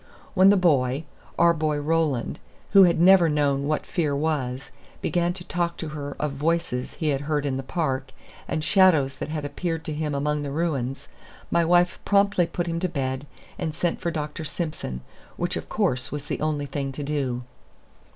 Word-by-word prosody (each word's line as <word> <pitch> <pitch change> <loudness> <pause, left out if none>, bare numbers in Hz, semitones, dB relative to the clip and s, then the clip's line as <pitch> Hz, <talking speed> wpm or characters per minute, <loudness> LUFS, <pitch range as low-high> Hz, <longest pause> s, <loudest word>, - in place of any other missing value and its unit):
When 190 0 +6
the 205 - +6
boy 140 -5 +2 0.3
our 170 0 +5
boy 155 -2 0
Roland, 150 -5 0 0.3
who 195 -1 +8
had 170 -2 +2
never 180 -1 +7
known 140 -2 +1
what 155 0 -1
fear 150 -5 0
was 140 -4 -2 0.3
began 175 -1 0
to 180 -1 -8
talk 175 -1 -2
to 160 - -5
her 145 -2 -6
of 150 -1 -1
voices 145 -3 -1
he 155 - -1
had 140 -1 0
heard 145 0 -1
in 135 -2 0
the 135 - -2
park, 135 -2 -2 0.4
and 155 - -2
shadows 160 -8 +4
that - - -5
had 155 -2 -3
appeared 165 +2 -3
to 155 - -3
him 150 -1 -2
among 150 +1 0
the 145 - -4
ruins, 140 -4 -2 0.4
my 170 - +3
wife 175 +1 +3
promptly 200 -3 +3
put 175 +1 -3
him 165 -1 -2
to 185 - -1
bed 135 -2 -3 0.3
and 155 -2 -3
sent 170 +1 -1
for 170 - 0
Dr. 155 0 -4
Simson, 155 - -4 0.4
which, - - -1
of - - -5
course, 125 0 0
was 145 -1 -5
the - - -4
only 150 -2 0
thing 135 0 -3
to 145 - -5
do. 135 -4 -2
150 Hz, 190 wpm, -25 LUFS, 140-170 Hz, 0.4 s, who